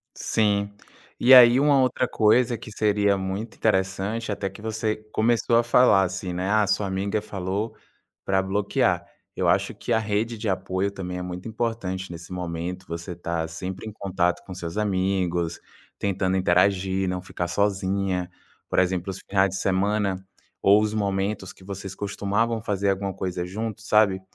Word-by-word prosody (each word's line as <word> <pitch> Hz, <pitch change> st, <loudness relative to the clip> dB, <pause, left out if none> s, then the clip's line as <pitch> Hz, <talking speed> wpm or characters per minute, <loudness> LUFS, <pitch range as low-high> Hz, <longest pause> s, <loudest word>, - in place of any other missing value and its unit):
Sim. 100 Hz, -2 st, +1 dB, 0.5 s
E 125 Hz, -, +5 dB
aí, 125 Hz, -1 st, +9 dB
uma 140 Hz, -1 st, +4 dB
outra 130 Hz, 0 st, +1 dB
coisa 120 Hz, +2 st, +3 dB
que 110 Hz, -, -10 dB
seria 105 Hz, -1 st, +2 dB
muito 95 Hz, +4 st, -4 dB
interessante, 100 Hz, +2 st, 0 dB
até 100 Hz, -1 st, -3 dB
que 95 Hz, -, -13 dB
você 110 Hz, 0 st, -2 dB, 0.2 s
começou 115 Hz, +1 st, +2 dB
a 120 Hz, -, +5 dB
falar 120 Hz, -4 st, +5 dB
assim, 95 Hz, 0 st, -3 dB
né: 90 Hz, +2 st, -2 dB
"Ah, 105 Hz, 0 st, +3 dB
sua 100 Hz, +1 st, +1 dB
amiga 100 Hz, +2 st, -1 dB
falou 100 Hz, +2 st, -3 dB, 0.5 s
pra 95 Hz, 0 st, +2 dB
bloquear". 100 Hz, +2 st, 0 dB, 0.3 s
Eu -, -, 0 dB
acho -, -, +2 dB
que -, -, -4 dB
a -, -, +4 dB
rede 110 Hz, +2 st, -1 dB
de 110 Hz, 0 st, -4 dB
apoio 95 Hz, +1 st, -1 dB
também 90 Hz, -2 st, -6 dB
é -, -, -4 dB
muito 90 Hz, +3 st, -6 dB
importante 110 Hz, -5 st, -3 dB
nesse 85 Hz, +1 st, -9 dB
momento. 90 Hz, +1 st, -4 dB
Você 85 Hz, +1 st, -6 dB
tá 85 Hz, -1 st, -3 dB
sempre 90 Hz, +5 st, -6 dB
em -, -, -7 dB
contato 95 Hz, -2 st, -1 dB
com 95 Hz, -, -8 dB
seus 85 Hz, 0 st, -6 dB
amigos, 95 Hz, -4 st, 0 dB, 0.4 s
tentando 95 Hz, -1 st, 0 dB
interagir, 95 Hz, +1 st, +2 dB
não 90 Hz, 0 st, -2 dB
ficar 90 Hz, -1 st, -4 dB
sozinha. 95 Hz, -2 st, 0 dB, 0.4 s
Por -, -, -1 dB
exemplo, 90 Hz, 0 st, +1 dB
os 95 Hz, -, -6 dB
finais 95 Hz, 0 st, +3 dB
de 95 Hz, -, -5 dB
semana 100 Hz, +1 st, +1 dB, 0.4 s
ou 100 Hz, +2 st, +5 dB
os 105 Hz, 0 st, 0 dB
momentos 100 Hz, -2 st, -2 dB
que 95 Hz, -, -18 dB
vocês 95 Hz, 0 st, -7 dB
costumavam 105 Hz, +3 st, -1 dB
fazer 100 Hz, -2 st, 0 dB
alguma 95 Hz, 0 st, -2 dB
coisa 90 Hz, -2 st, -3 dB
juntos, 105 Hz, +2 st, -5 dB
sabe? 105 Hz, -4 st, +4 dB
100 Hz, 165 wpm, -25 LUFS, 95-105 Hz, 0.5 s, aí